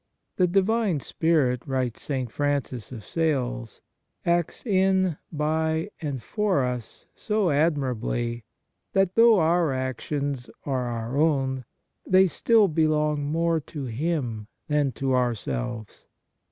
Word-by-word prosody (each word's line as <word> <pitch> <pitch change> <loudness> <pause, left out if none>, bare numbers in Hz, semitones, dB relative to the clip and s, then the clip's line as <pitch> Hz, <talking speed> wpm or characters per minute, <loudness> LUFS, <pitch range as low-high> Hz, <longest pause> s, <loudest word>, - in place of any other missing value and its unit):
" - - -53
The 180 - +4
Divine 195 -1 +2
Spirit," 140 -5 +1
writes 130 -4 -2
St. 130 -5 -3
Francis 140 -5 -2
of 115 -5 -8
Sales, 125 - -2 0.2
" - - -52
acts 170 +4 0
in, 190 -5 +2
by, 160 +3 0
and 140 -6 -4
for 205 -9 +1
us 125 -2 -5
so 210 -5 0
admirably 125 -6 0 0.5
that, 195 -2 +2
though 230 0 +6
our 165 -2 +3
actions 130 +1 -3 0.2
are 130 -3 -1
our 120 +2 -3
own, 135 -5 +1 0.4
they 185 +1 +5
still 215 +4 +3
belong 150 -2 +1
more 165 +2 +1
to 145 -1 -7
Him 125 -4 -2 0.2
than 150 -2 +1
to 135 -1 -1
ourselves. 110 - -2
145 Hz, 125 wpm, -25 LUFS, 125-170 Hz, 0.5 s, though